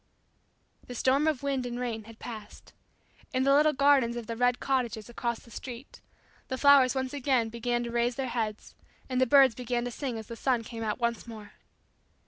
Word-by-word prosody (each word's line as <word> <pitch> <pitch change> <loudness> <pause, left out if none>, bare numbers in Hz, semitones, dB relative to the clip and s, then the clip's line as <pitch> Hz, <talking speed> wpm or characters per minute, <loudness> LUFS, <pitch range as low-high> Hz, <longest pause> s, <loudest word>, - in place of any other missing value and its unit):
The 245 - -7
storm 270 +5 +2
of 295 -4 0
wind 275 -2 -1
and 245 0 -4
rain 230 -3 -3
had 225 0 -13
passed. 215 -4 -10 0.6
In 255 - +2
the 275 +1 +4
little 300 +2 +5
gardens 275 -4 +3
of 240 -1 -5
the 230 - -5
"Red 245 +1 +2
Cottages" 240 -5 -1
across 235 -1 -3
the 235 - -18
street, 250 +3 -9 0.5
the 260 - -3
flowers 280 -2 +6
once 260 0 -2
again 260 -5 +1
began 240 +1 -1
to 235 - -5
raise 240 +1 0
their 270 0 -2
heads 220 -3 -3 0.4
and 255 0 0
the 260 - +4
birds 270 -1 +6
began 245 0 -2
to 245 - -4
sing 250 -1 -4
as 220 - -7
the 230 - -8
sun 245 -1 0
came 230 0 -8
out 215 -2 -2
once 235 -1 -2
more. 215 -3 -10
245 Hz, 200 wpm, -29 LUFS, 230-265 Hz, 0.6 s, flowers